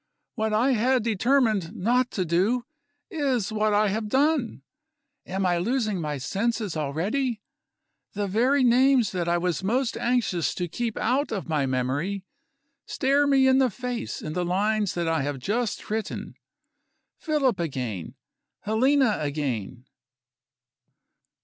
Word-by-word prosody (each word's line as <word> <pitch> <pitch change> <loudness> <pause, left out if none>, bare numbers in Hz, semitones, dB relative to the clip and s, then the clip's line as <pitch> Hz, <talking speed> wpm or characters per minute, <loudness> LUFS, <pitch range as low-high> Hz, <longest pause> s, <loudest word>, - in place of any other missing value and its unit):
What 220 -2 -1
I 235 +6 +3
had 250 +1 +2
determined 220 -4 +1
not 245 +5 +1
to 185 - -1
do, 200 +9 +1 0.5
is 260 -9 0
what 215 0 +1
I 210 0 +3
have 215 +2 -2
done. 265 - +1 0.6
Am 190 +1 -2
I 175 -1 +2
losing 215 -2 0
my 150 -2 -3
senses 205 - -2
already? 205 - -2 0.7
The 205 0 -2
very 250 +8 +2
names 250 -1 +4
that 175 -2 -2
I 170 0 +2
was 180 +1 -1
most 245 +5 0
anxious 235 -9 0
to 180 - -2
keep 230 +6 -3
out 260 +6 0
of 200 -5 -3
my 150 -4 0
memory 140 +10 -2 0.6
stare 280 +1 +2
me 270 -1 +4
in 260 0 +5
the 260 -2 +3
face 245 +1 -5
in 155 - -4
the 180 - -1
lines 205 +3 0
that 170 -1 -1
I 165 -2 +1
have 145 0 -2
just 210 - -2
written. 220 0 -3 0.9
Philip 285 - +1
again! 125 - -4 0.5
Helena 255 +2 +2
again! 135 -6 -3
215 Hz, 135 wpm, -25 LUFS, 175-250 Hz, 0.9 s, in